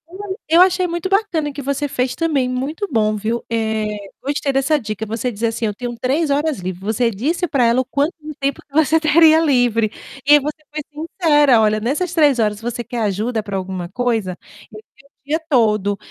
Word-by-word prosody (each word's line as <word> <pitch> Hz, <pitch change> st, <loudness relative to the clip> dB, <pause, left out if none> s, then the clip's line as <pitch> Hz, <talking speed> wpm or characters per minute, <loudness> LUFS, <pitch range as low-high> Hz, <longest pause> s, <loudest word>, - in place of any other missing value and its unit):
Eu 365 Hz, +3 st, -12 dB, 0.3 s
eu 340 Hz, -, +8 dB
achei 365 Hz, 0 st, +4 dB
muito 345 Hz, +1 st, -3 dB
bacana 380 Hz, -6 st, 0 dB
o -, -, -9 dB
que 285 Hz, -, -6 dB
você 280 Hz, +1 st, -2 dB
fez 250 Hz, -2 st, -1 dB
também, 280 Hz, -3 st, 0 dB
muito 275 Hz, +9 st, -3 dB
bom 215 Hz, -3 st, +1 dB
viu? 220 Hz, +3 st, -2 dB
Eh, 220 Hz, -1 st, -1 dB, 0.4 s
gostei 285 Hz, 0 st, -1 dB
dessa 270 Hz, +3 st, +2 dB
dica, 220 Hz, -4 st, -5 dB
você 225 Hz, +3 st, -3 dB
diz, 215 Hz, 0 st, -9 dB
assim: 230 Hz, 0 st, 0 dB
"Eu 210 Hz, -, -1 dB
tenho 240 Hz, +3 st, -5 dB
3 285 Hz, +6 st, 0 dB
horas 290 Hz, -1 st, 0 dB
livre.", 185 Hz, 0 st, -5 dB
você 220 Hz, +4 st, 0 dB
disse 300 Hz, -, -1 dB
para 275 Hz, -5 st, +1 dB
ela 235 Hz, +3 st, +3 dB
quanto 285 Hz, +5 st, 0 dB, 0.3 s
tempo 275 Hz, 0 st, -1 dB
que 280 Hz, -, -32 dB
você 315 Hz, +1 st, +3 dB
teria 315 Hz, +1 st, +5 dB
livre, 245 Hz, -8 st, +2 dB, 0.4 s
e 295 Hz, -, +7 dB
aí 295 Hz, -, +8 dB
você 300 Hz, +2 st, -5 dB
foi 305 Hz, 0 st, -4 dB
sincera: 295 Hz, -5 st, +3 dB
"Olha, 215 Hz, 0 st, +2 dB
nessas 300 Hz, +11 st, -2 dB
3 295 Hz, -6 st, +4 dB
horas 210 Hz, -2 st, 0 dB
você 240 Hz, +1 st, -4 dB
quer 235 Hz, +1 st, -5 dB
ajuda 215 Hz, +3 st, -1 dB
para 205 Hz, -2 st, -6 dB
alguma 185 Hz, -2 st, -4 dB
coisa? 220 Hz, -4 st, -1 dB, 0.3 s
Eu 215 Hz, -, -10 dB, 0.2 s
tenho -, -, -30 dB
o -, -, -58 dB
dia 315 Hz, +2 st, +1 dB
todo.", 210 Hz, -6 st, +2 dB
255 Hz, 205 wpm, -19 LUFS, 220-305 Hz, 0.4 s, eu